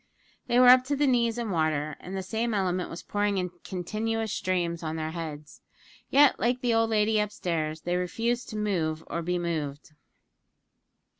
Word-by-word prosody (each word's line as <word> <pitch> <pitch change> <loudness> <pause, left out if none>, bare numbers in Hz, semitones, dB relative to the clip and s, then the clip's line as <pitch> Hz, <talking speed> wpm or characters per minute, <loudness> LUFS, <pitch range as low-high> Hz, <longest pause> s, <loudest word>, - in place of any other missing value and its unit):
They 240 - +3
were 250 0 +8
up 255 0 +8
to 285 +2 0
the 290 +1 +2
knees 240 -3 +2
in 235 -3 -2
water, 155 -3 0
and 190 +2 -6
the 190 - -3
same 220 +4 -1
element 185 -2 0
was 165 - -8
pouring 205 -1 0
in 180 -1 -2
continuous 220 +4 -2
streams 175 -2 -1
on 160 -1 -3
their 160 0 -3
heads 155 -3 -7 0.5
yet, 285 0 +5
like 245 +2 +1
the 240 -2 +1
old 225 0 +3
lady 215 0 +2
up 210 0 -2
stairs, 160 -6 -2
they 175 +1 -1
refused 230 +7 -1
to 215 - -5
move 165 -7 -1
or 170 - -3
be 180 +2 -1
moved. 155 -5 -3
190 Hz, 180 wpm, -27 LUFS, 165-225 Hz, 0.5 s, were